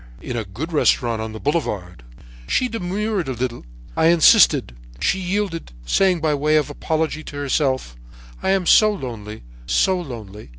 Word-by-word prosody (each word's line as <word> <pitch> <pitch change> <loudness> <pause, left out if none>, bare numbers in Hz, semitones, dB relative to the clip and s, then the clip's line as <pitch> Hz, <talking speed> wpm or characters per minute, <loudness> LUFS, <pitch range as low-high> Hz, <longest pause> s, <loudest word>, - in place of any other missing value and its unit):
"'In 125 - -6
a 115 - -2
good 135 - -6
restaurant 120 -6 +2
on 110 0 -5
the 110 - -8
Boulevard.' 105 - -2 0.5
"She 255 - +1
demurred 205 - -2
a 130 - -2
little. 120 0 -4 0.3
I 160 - +3
insisted. 165 - +5 0.2
She 190 - +1
yielded, 185 - -3
saying 180 - +2
by 155 -1 +1
way 150 +2 +1
of 150 -1 0
apology 155 +1 -2
to - - -9
herself: 135 - -1 0.5
'I - - -1
am 190 -1 +2
so 215 +4 +6
lonely—so 110 - -2
lonely.' 110 - -9
150 Hz, 155 wpm, -21 LUFS, 110-175 Hz, 0.5 s, so